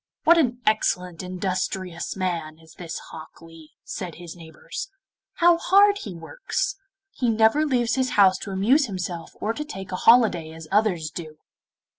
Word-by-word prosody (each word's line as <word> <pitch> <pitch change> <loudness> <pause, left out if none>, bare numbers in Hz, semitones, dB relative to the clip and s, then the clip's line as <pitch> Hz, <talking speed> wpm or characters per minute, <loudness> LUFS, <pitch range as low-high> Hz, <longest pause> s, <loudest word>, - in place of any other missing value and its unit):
'What 335 +1 +6
an 250 -5 0
excellent 180 -5 0
industrious 185 -1 -3
man 170 -5 -3
is 160 0 -18
this 170 -2 -7
Hok 160 -1 -11
Lee!' 165 -2 -15
said 180 -4 -6
his 175 -1 -10
neighbours; 165 - -8 0.4
'how 345 -1 +4
hard 405 +3 +4
he 195 -4 -7
works: 390 - -3 0.4
he 245 -9 -1
never 225 +7 +3
leaves 245 -3 +1
his 260 -1 +1
house 190 -2 +5
to - - -7
amuse 235 +10 +2
himself 180 -4 -6
or 220 - -1
to 300 - -4
take 195 -11 -8
a - - -2
holiday 210 -10 +5
as 160 -1 -10
others 190 -7 +1
do! 155 -3 -8
190 Hz, 160 wpm, -24 LUFS, 170-245 Hz, 0.4 s, What